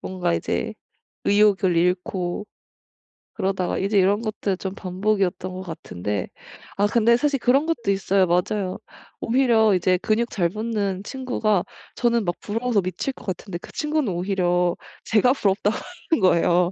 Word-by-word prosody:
뭔가 185 - -2
이제 65 -6 -1 0.5
의욕을 200 -4 +3
잃고 180 +2 0 0.9
그러다가 190 -3 -1
이제 200 +1 +2
이런 200 +3 +3
것들 205 -3 -2
좀 190 0 -5
반복이었던 190 -1 -1
것 185 - -6
같은데 105 - -4 0.5
아 205 +1 +2
근데 235 +2 +4
사실 285 +1 +1
그런 275 +6 +3
것도 235 -11 0
있어요. 195 0 +2
맞아요. 185 +2 0 0.4
오히려 225 -4 +3
이제 185 0 +2
근육 225 +4 0
잘 175 -4 +1
붙는 205 -2 -2
친구가 220 -7 0 0.3
저는 235 -3 +1
막 175 -1 -1
부러워서 225 0 0
미칠 185 +9 -3
것 230 - -15
같은데 185 -1 -4
그 - - -13
친구는 300 -7 -1
오히려 180 -1 +1 0.3
제가 225 +4 +4
부럽다고 205 -3 +1 0.4
하는 325 - +4
거예요. 175 -1 +3
195 Hz, 315 characters per minute, -23 LUFS, 180-220 Hz, 0.9 s, 근데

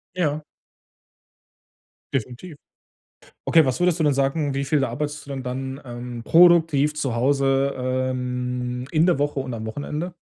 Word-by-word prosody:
Ja. 155 -4 -1 1.7
Definitiv. 135 +6 -4 0.9
Okay, 160 -3 +5
was 130 +3 -1
würdest 180 -1 +2
du - - +2
denn 145 -2 +3
sagen, 140 +1 0
wie 140 0 -2
viel 145 0 +1
da 130 - 0
arbeitest 145 +4 -4
du - - -14
denn 135 -2 -5
dann, 130 +2 -5
ähm, 120 -1 -7
produktiv 160 -3 +5
zu 135 -6 -2
Hause, 135 +2 +2
ähm, 125 -1 -2
in 160 +1 +3
der 175 -6 +3
Woche 145 -1 -1
und 130 -2 -4
am 110 -1 -5
Wochenende? 150 +9 -4
135 Hz, 150 wpm, -23 LUFS, 125-150 Hz, 1.7 s, Okay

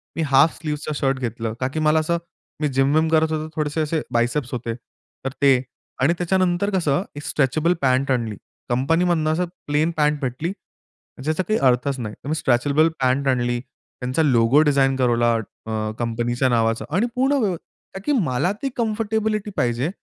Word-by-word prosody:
मी 165 - -1
half 140 +3 +5
स्लीव्हजचा 150 -1 -4
shirt 135 -1 0
घेतलं. 115 -2 -3
का 130 - 0
की 155 +4 -4
मला 155 +1 +3
असं 170 +2 0 0.4
मी 150 - +2
जिम 135 +1 +2
विम 160 +1 +3
करत 160 0 +3
होतो 155 0 -2
थोडेसे 155 +1 -1
असे 155 +1 -1
बायसेप्स 120 +3 0
होते. 115 -2 -3 0.5
तर 135 - +1
ते. 135 -3 +5 0.4
आणि 140 +6 +4
त्याच्यानंतर 185 +1 +1
कसं 165 -2 +1
एक 145 - -7
स्ट्रेचेबल 155 +3 +1
पँट 130 +1 +2
आणली. 115 -4 -1 0.3
कंपनीमधून 160 +6 +1
असं 160 +3 +1 0.2
प्लेन 150 +3 +1
पँट 150 0 +2
भेटली, 135 +6 -2 0.7
ज्याचा 155 +5 0
काही 215 +5 0
अर्थच 130 +1 +2
नाही. 105 -3 -5
तर - - -9
मी 155 - 0
स्ट्रेचेबल 145 +3 +2
पँट 130 +2 +2
आणली, 120 -1 +1
त्यांचा 130 +2 -4
लोगो 130 +1 +4
डिझाइन 135 -1 +3
करवला 120 -2 +2 0.3
अ, 110 -1 -2
कंपनीच्या 120 +2 0
नावाचा 115 -1 +1
आणि 215 +6 +2
पूर्ण 265 +3 +2
वे 190 -4 +1 0.4
का 195 - -6
की 295 - +1
मला 145 +3 0
ती 275 - -1
कम्फर्टेबिलिटी 220 -2 -1
पाहिजे 125 +1 0
140 Hz, 170 wpm, -22 LUFS, 125-160 Hz, 0.7 s, half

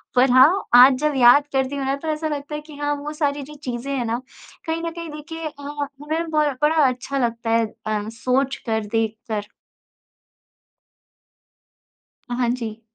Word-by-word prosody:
पर 250 +1 +5
हाँ, 285 +10 +6
आज 255 +2 +9
जब 300 0 +1
याद 255 +4 +6
करती 265 +1 0
हूँ 275 - -2
ना 270 +1 0
तो 320 - -8
ऐसा 310 +1 -3
लगता 290 0 -4
है 300 - -5
कि, 300 0 -13
हाँ 290 0 -1
वो 290 +1 -6
सारी 290 -2 -1
जो 300 +2 -11
चीज़ें 250 +2 -4
हैं 245 - -1
ना 230 +2 -2 0.5
कहीं 325 +1 -1
न 335 - -2
कहीं 335 0 -7
देखिए 325 +2 -7
अ, 290 -1 -11 0.4
हमें 320 +2 -2
बहुत 300 -3 +1
बड़ा 305 +2 +4
अच्छा 255 +2 -3
लगता 230 0 -4
है 230 0 +3 0.2
अ, 215 0 -2
सोचकर, 250 -2 -1
देखकर। 220 -1 -2 2.8
अ, - - -3
हाँ 245 -2 +1
जी। 225 -3 -6
275 Hz, 170 wpm, -22 LUFS, 240-300 Hz, 2.8 s, आज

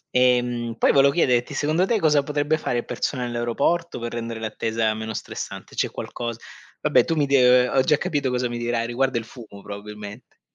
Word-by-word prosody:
Ehm, 120 -2 +2
poi - - +4
volevo 140 0 +5
chiederti, 125 -5 +2
secondo 155 +6 +1
te 220 +2 +1
cosa 150 -3 +4
potrebbe 145 +2 0
fare 120 - -1
il - - -6
personale 125 -3 -2
all'aeroporto 120 +9 -1
per 120 0 -5
rendere 115 -1 -4
l'attesa 110 0 -1
meno 110 +1 -5
stressante? - - -7
C'è - - 0
qualcos 120 -1 -5 0.4
vabbè - - +4
tu 165 - 0
mi 150 -2 +2
d 125 -2 +5
ho 135 - +4
già 145 +3 +3
capito 140 -3 -1
cosa 125 0 0
mi 120 - -4
dirai, 120 -1 -1
riguarda 125 +1 0
il 115 - -2
fumo 110 -4 -12
probabilmente. 105 +2 -9
125 Hz, 190 wpm, -23 LUFS, 115-140 Hz, 0.4 s, volevo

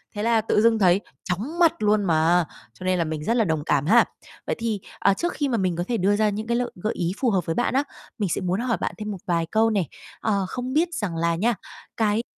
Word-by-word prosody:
thế 205 - -2
là 230 -1 +3
tự 210 -1 +2
dưng 225 0 +4
thấy 185 +1 +4 0.2
chóng 225 - -3
mặt 335 -2 +6
luôn 210 0 +3
mà. 165 0 +3 0.3
Cho 185 - -10
nên 185 0 +2
là - - +3
mình 155 -1 -4
rất 230 - +1
là 225 - +4
đồng 160 -3 -1
cảm 140 -1 +1
ha. 230 +7 +6 0.4
Vậy - - 0
thì, 225 -3 -1 0.2
à, 195 - +4
trước 345 - -2
khi 290 - -1
mà 240 -4 0
mình 185 -3 0
có 175 - -1
thể 240 - 0
đưa 200 +2 +2
ra 215 0 +2
những 215 +2 -4
cái 235 0 +1
lợi 245 0 -1
gợi 215 - 0
ý 170 -1 -1
phù 255 - +2
hợp 185 -5 +1
với 165 - -2
bạn 245 - 0
á, 275 +2 +3 0.3
mình 200 -5 -1
sẽ 190 - -1
muốn 185 +3 0
hỏi 240 -1 0
bạn - - -1
thêm 210 -1 -4
một 195 - -5
vài 170 -2 +1
câu 225 +1 +3
nè. 200 -5 +1 0.4
Ờ, 200 -3 0
không 255 +1 -4
biết 330 +4 +3
rằng 190 - -2
là 170 0 +1
nha, 225 +6 +1 0.4
cái 220 +1 +1
210 Hz, 270 wpm, -24 LUFS, 180-230 Hz, 0.4 s, mặt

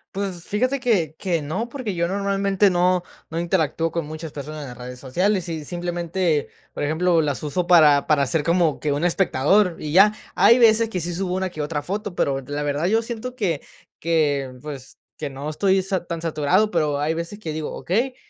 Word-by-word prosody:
Pues, 190 -3 -3
fíjate 255 +6 0
que 200 - +1
que 170 -6 -1
no, 215 +11 -3
porque 240 -6 -4
yo 170 0 0
normalmente 195 0 +1
no 180 0 +2 0.3
no 165 +1 -3
interactúo 165 -2 0
con 165 -2 -3
muchas 155 0 -7
personas 150 +1 -7
en 140 - -7
las 125 - -10
redes 125 0 -8
sociales. 180 +8 0
Y 155 -2 -4
simplemente, 175 -2 -1 0.2
por - - -5
ejemplo, 165 +3 +2
las 145 -1 -2
uso 170 +4 -2
para 150 -5 +6
para 150 -2 +3
hacer 150 +4 0
como 170 -2 +2
que 150 - -1
un 145 +5 0
espectador, 180 +1 +2
y 150 - -5
ya. 195 +6 +7 0.2
Hay 235 - +6
veces 225 -1 +5
que 185 - -3
sí 175 +1 -4
subo 180 +1 -2
una 190 -1 -2
que 155 - -5
otra 150 -1 -3
foto, 200 +1 -4
pero 135 -1 0
la 145 +3 -4
verdad 145 +2 -1
yo 225 +3 +3
siento 240 +2 -6
que 175 - -1 0.4
que, 145 -5 +1
pues, 140 -3 -8 0.2
que 150 - -4
no 135 +2 -7
estoy 190 +4 +2
sa 190 -2 -2
tan 170 -2 -4
saturado, 170 +7 +2
pero 150 -4 +1
hay 150 +2 0
veces 170 +5 -5
que 165 -7 -5
digo: 155 -1 -4
"Okey, 245 +8 -1
170 Hz, 205 wpm, -22 LUFS, 150-195 Hz, 0.4 s, ya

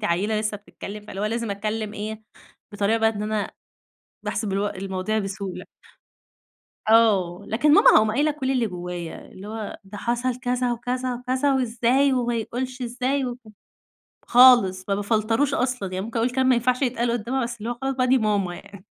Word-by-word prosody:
أنتِ - - -5
عيلة 210 +4 +1
لسه 215 -1 -2
بتتكلم، 210 0 -10
فاللي 195 - -6
هو - - 0
لازم 230 0 -2
أتكلم 215 +1 -3
إيه 215 +1 -5 0.5
بطريقة 205 +2 +1
بقى 225 0 +4
إن 210 -1 -5
أنا 210 -1 -2 0.7
باحسب 210 -2 -2
اللي 195 +1 0
هو 205 - +1
المواضيع 190 +2 -2
بسهولة. 195 -2 -5 1.2
آه، 205 -5 +4
لكن 290 +7 +2
ماما - - +8
هاقوم 215 0 +5
قايلة 290 +7 +2
كل 280 -3 -2
اللي 250 -3 +1
جوايا. 180 -3 -6
اللي 195 +2 -10
هو 220 -1 -6
ده 200 +1 -9
حصل 240 +2 -1
كذا، 250 -1 0
وكذا، 250 +2 -2
وكذا، 255 +3 0
وإزاي 255 +2 +2
وما 240 -2 0
يقولش 250 +3 -4
إزاي، 255 +3 -1
وك 245 0 -4 0.9
خالص 240 -7 +6
ما 200 - +2
بافلتروش 225 +7 +1
أصلًا 245 -7 -1
يعني 185 +1 -3
ممكن 230 +1 -4
أقول 235 +2 +1
كلام 260 +1 +1
ما 260 - +6
ينفعش 250 +2 +1
يتقال 240 -2 0
قدامها 240 +3 -1
بس 235 0 -4
اللي 225 +3 -4
هو - - -1
خلاص 270 0 0
بقى 255 -1 +1
دي 260 +1 +4
ماما 205 -5 0
يعني 200 +1 -13
225 Hz, 185 wpm, -24 LUFS, 205-250 Hz, 1.2 s, ماما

